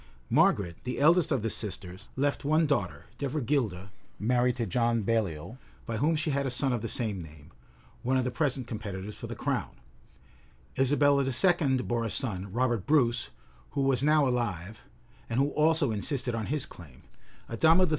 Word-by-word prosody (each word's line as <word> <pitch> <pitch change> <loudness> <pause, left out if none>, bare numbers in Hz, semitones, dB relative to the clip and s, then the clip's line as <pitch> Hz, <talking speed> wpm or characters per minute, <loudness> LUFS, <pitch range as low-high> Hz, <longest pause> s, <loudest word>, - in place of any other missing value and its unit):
Margaret, 85 -4 +3
the 125 0 -3
eldest 165 +3 +4
of 130 -7 +1
the 115 - 0
sisters, 95 -1 -4
left 140 +2 0
one 155 +3 +3
daughter, 145 -2 -1
Devergilda, 125 - -1 0.3
married 125 +3 +2
to 120 -2 -2
John 115 +2 +1
Baliol, 110 0 -1 0.3
by 115 -2 -3
whom 155 +7 +2
she 155 0 -1
had 140 0 0
a 135 - -1
son 130 +1 +1
of 120 - -1
the 115 - -4
same 105 -6 -2
name, 80 0 -13 0.5
one 130 +2 +1
of 130 - +1
the 125 - -2
present 130 -1 0
competitors 105 -2 -6
for - - -7
the - - -6
crown: - - -2 1.0
Isabella 140 +1 +3
II. 135 +1 +2
bore 120 -1 -1
a 115 - -2
son, 100 -6 -3
Robert 120 -3 0
Bruce, 120 -5 +2 0.4
who 140 - 0
was 135 -2 +2
now 150 -1 +4
alive, 110 -5 -2 0.5
and 115 +2 0
who 140 +1 +3
also 155 -4 +3
insisted 120 +4 -2
on 115 -2 -3
his 150 -1 -1
claim: 75 -8 -14 0.4
Adama 160 +10 +4
III. 180 - +3
125 Hz, 175 wpm, -29 LUFS, 110-140 Hz, 1.0 s, eldest